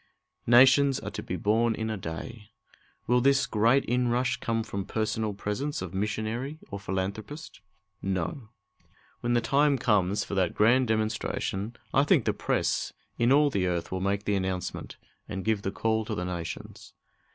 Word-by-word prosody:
"Nations 135 +3 +6
are - - -6
to - - -5
be - - -4
born 115 +2 +2
in 110 0 -3
a - - -2
day." 105 +5 -7 0.6
Will 125 +1 +3
this 135 +1 +4
great 115 +5 +3
inrush 125 +1 +1
come 115 -1 -1
from 100 -3 -4
personal 110 0 -2
presence 105 +9 -3
of 95 -1 -6
missionary 110 +8 -2
or 100 - -4
philanthropist? 100 - -5 0.4
No. 95 +5 -3 0.7
When 120 0 -1
the 120 - +3
time 140 +3 +3
comes 105 -4 +2
for - - -7
that 95 -3 +1
grand 120 +4 +4
demonstration 110 -1 -2 0.2
I 135 - +5
think 145 - +3
the - - +2
press - - -1 0.3
in 120 +2 +3
all 145 +1 +5
the 95 -5 0
earth 85 -1 -2
will 95 0 -2
make 100 +1 0
the 105 - +1
announcement, 95 -2 -3 0.3
and 95 -2 -5
give 110 -2 +1
the 95 - -2
call 110 +2 0
to 110 - -3
the 90 - -3
nations. 85 -3 -6
110 Hz, 165 wpm, -28 LUFS, 95-120 Hz, 0.7 s, Nations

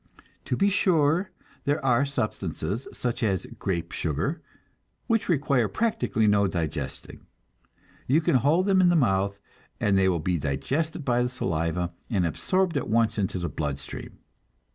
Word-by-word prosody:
To 125 - -1
be 200 0 +3
sure, 175 -1 +2 0.4
there 145 -1 0
are 125 +1 +4
substances, 110 - -3
such 120 0 -3
as 100 -6 0
grape 85 -3 -2
sugar, 80 - -2 0.6
which 225 -4 0
require 140 -7 +2
practically 125 - 0
no 105 -1 +4
digesting; 85 -5 -5 0.8
you 140 +5 +4
can 165 -4 +3
hold 155 +9 +3
them 190 -2 +4
in 180 - +5
the 175 - +3
mouth, 100 - +2 0.4
and 100 -2 +2
they 95 -1 +4
will 90 - +1
be 85 +2 0
digested 140 - -2
by 125 -1 +2
the 125 - +1
saliva, 85 -6 -2 0.2
and 100 -7 +1
absorbed 185 - 0
at 140 - -3
once 110 0 +2
into 95 -1 -1
the 85 -1 -2
blood 75 -5 -3
stream. 70 - -9
120 Hz, 155 wpm, -26 LUFS, 95-155 Hz, 0.8 s, in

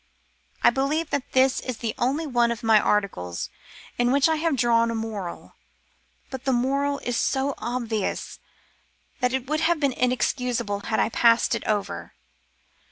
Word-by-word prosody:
I - - +7
believe 295 +5 -1
that 280 -2 -2
this 260 0 +4
is 255 -3 -5
the 225 -1 -3
only 280 +6 0
one 240 -4 +2
of 235 0 -5
my 220 -1 +5
articles 185 - -1 0.5
in 245 0 +3
which 280 +2 +4
I 320 -1 +1
have 320 -1 +1
drawn 230 -2 +3
a 230 - -2
moral, 215 -5 -5 0.8
but 265 -1 -6
the 265 - +2
moral 275 +3 +1
is 245 - -2
so 270 +3 0
obvious 235 -4 -3 0.8
that 250 -2 +1
it 260 -1 -2
would 310 +2 0
have 330 0 +2
been 280 -3 +1
inexcusable 245 -4 0
had - - 0
I - - +2
passed 230 0 +3
it - - -2
over. 205 -2 -2
245 Hz, 165 wpm, -25 LUFS, 230-275 Hz, 0.8 s, I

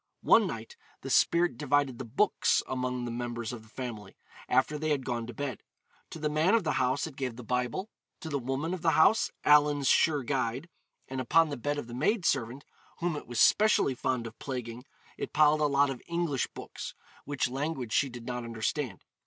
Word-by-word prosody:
One - - +5
night 480 - -7 0.2
the - - -5
spirit 170 -7 +3
divided 145 -3 +1
the 130 - -5
books 135 - +2
among 125 -1 -2
the 120 - -4
members 120 -1 -4
of 120 - -7
the 110 - -19
family, 115 -5 -7 0.3
after 130 +4 +2
they 155 +1 -1
had 140 -4 0
gone 120 -2 -3
to 120 - -7
bed. 135 -3 -4 0.5
To - - -8
the 155 -1 -1
man 155 +7 +3
of 225 - +2
the 160 - 0
house 130 +2 +1
it 160 -4 -8
gave 130 -4 -3
the 125 - -9
Bible, 125 - -2 0.3
to - - -6
the 145 -3 -1
woman 135 +7 -2
of 185 - -4
the 165 -2 +3
house 190 +8 +5 0.2
'Allen's 145 -1 +5
Sure 150 -4 +3
Guide,' 130 +3 -2 0.4
and 130 0 -3
upon 165 +5 +4
the 145 - -3
bed 145 +3 -2
of 145 - -4
the 120 - -10
maid 175 - 0
servant 130 +1 0 0.3
(whom 175 -2 -1
it 150 - -7
was 120 -1 -3
specially 215 -10 +4
fond 125 -1 -2
of 115 0 -9
plaguing) 125 -2 -5 0.3
it - - -4
piled 150 0 +4
a - - +4
lot 140 -1 +3
of 125 - -7
English 170 -6 -1
books, - - -7 0.3
which 145 -2 0
language 130 -2 -3
she 140 - +2
did 120 -1 -9
not 125 -1 -4
understand. 115 0 -3
135 Hz, 205 wpm, -29 LUFS, 120-150 Hz, 0.5 s, One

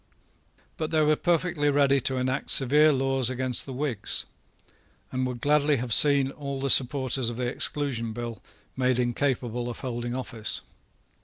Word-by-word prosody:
But 155 -1 -3
they 160 -1 +1
were 155 0 +3
perfectly 165 -3 0
ready 140 -1 +3
to 130 +1 -1
enact 130 +1 -2
severe 150 +4 +5
laws 135 -2 +2
against 130 0 0
the - - -6
Whigs, 130 -5 -2 0.9
and 130 0 -1
would 125 -2 -6
gladly 145 +1 +2
have 120 -1 -2
seen 140 0 +4
all 140 -1 -6
the 135 0 0
supporters 130 -1 +3
of 120 - -7
the 125 - -2
Exclusion 125 -2 -2
Bill 120 0 -6 0.3
made 130 -1 +1
incapable 120 -1 -1
of 120 - -8
holding 120 -1 -4
office. 115 -4 -4
130 Hz, 155 wpm, -26 LUFS, 120-145 Hz, 0.9 s, severe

